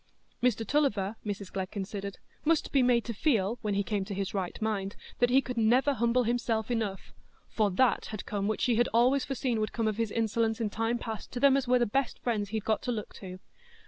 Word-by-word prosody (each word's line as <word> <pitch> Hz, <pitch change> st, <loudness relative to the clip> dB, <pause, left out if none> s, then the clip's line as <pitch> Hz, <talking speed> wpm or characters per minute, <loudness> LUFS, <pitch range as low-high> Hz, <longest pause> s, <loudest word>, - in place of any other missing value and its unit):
Mr 230 Hz, -2 st, +2 dB
Tulliver, 220 Hz, -7 st, +1 dB
Mrs 200 Hz, -2 st, -5 dB
Glegg 190 Hz, -1 st, -3 dB
considered, 200 Hz, -1 st, -5 dB, 0.3 s
must 320 Hz, 0 st, +1 dB
be 275 Hz, -, +4 dB
made 245 Hz, -2 st, +3 dB
to 235 Hz, -, -3 dB
feel, 225 Hz, -3 st, +1 dB
when 210 Hz, -2 st, -1 dB
he 200 Hz, -, +1 dB
came 205 Hz, 0 st, -1 dB
to 200 Hz, -1 st, -5 dB
his 195 Hz, 0 st, -3 dB
right 190 Hz, -3 st, -3 dB
mind, 205 Hz, -3 st, -2 dB, 0.2 s
that 245 Hz, -, +4 dB
he 265 Hz, +2 st, +5 dB
could 250 Hz, -2 st, -5 dB
never 250 Hz, +6 st, +4 dB
humble 235 Hz, 0 st, +2 dB
himself 230 Hz, -1 st, 0 dB
enough; 215 Hz, -5 st, -3 dB, 0.3 s
for 215 Hz, -2 st, +1 dB
that 240 Hz, +7 st, +2 dB
had 215 Hz, -2 st, -6 dB
come 200 Hz, -1 st, -2 dB
which 215 Hz, -, -1 dB
she 240 Hz, -3 st, +2 dB
had 240 Hz, -, +3 dB
always 255 Hz, +3 st, +4 dB
foreseen 260 Hz, -4 st, -1 dB
would 215 Hz, -, -2 dB
come 225 Hz, -2 st, 0 dB
of 215 Hz, -1 st, -1 dB
his 230 Hz, -2 st, 0 dB
insolence 225 Hz, 0 st, 0 dB
in 220 Hz, -3 st, -1 dB
time 225 Hz, +2 st, 0 dB
past 225 Hz, -2 st, -6 dB
"to 245 Hz, -, -3 dB
them 275 Hz, +1 st, +6 dB
as 270 Hz, -2 st, 0 dB
were 250 Hz, +1 st, +5 dB
the 240 Hz, -, +2 dB
best 270 Hz, +4 st, -1 dB
friends 210 Hz, -4 st, -1 dB
he'd 220 Hz, -1 st, -3 dB
got 220 Hz, -, +1 dB
to 250 Hz, -, -2 dB
look 215 Hz, -3 st, -4 dB
to." 185 Hz, -2 st, -8 dB
225 Hz, 230 wpm, -29 LUFS, 205-245 Hz, 0.3 s, them